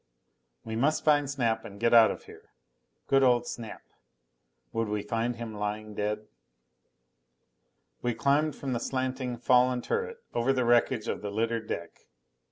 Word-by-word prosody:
We 110 0 -5
must 140 +7 +1
find 145 -2 +4
Snap 115 -5 0
and 100 0 -10
get 115 +1 +2
out 115 -1 +8
of - - -5
here. - - -15 0.6
Good 135 0 +3
old 120 -2 +4
Snap! 115 -2 -7 0.9
Would 115 0 0
we 105 -1 -2
find 115 +3 -1
him 115 -1 -6
lying 105 +1 -4
dead? 105 +1 -2 1.8
We 120 -2 -1
climbed 145 +5 +2
from 135 -2 -4
the 120 - -1
slanting, 130 -1 -2
fallen 125 +1 +3
turret, 465 0 -2 0.2
over 120 +3 +2
the 130 -2 +1
wreckage 120 -1 +3
of - - -2
the 105 - -4
littered 115 +1 -1
deck. 85 0 -6
120 Hz, 155 wpm, -29 LUFS, 110-130 Hz, 1.8 s, out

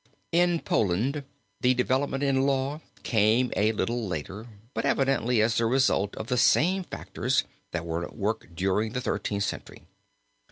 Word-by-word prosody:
In 175 0 +3
Poland 115 +9 0 0.4
the 125 0 +3
development 135 +2 0
in 135 -1 +2
law 140 +2 -1 0.2
came 115 +3 +2
a 105 +2 +3
little 120 +2 -1
later 95 +6 -5 0.3
but - - -2
evidently 125 -4 +2
as 110 +1 +2
the 115 - +2
result 120 -5 +2
of 110 - -5
the 125 0 0
same 185 +8 +4
factors - - -1 0.3
that 85 -1 -4
were 85 +1 -2
at - - -8
work 110 +2 -2
during 95 +5 0
the 125 - -2
Thirteenth 100 -4 -1
Century. - - -5
120 Hz, 155 wpm, -27 LUFS, 105-135 Hz, 0.4 s, same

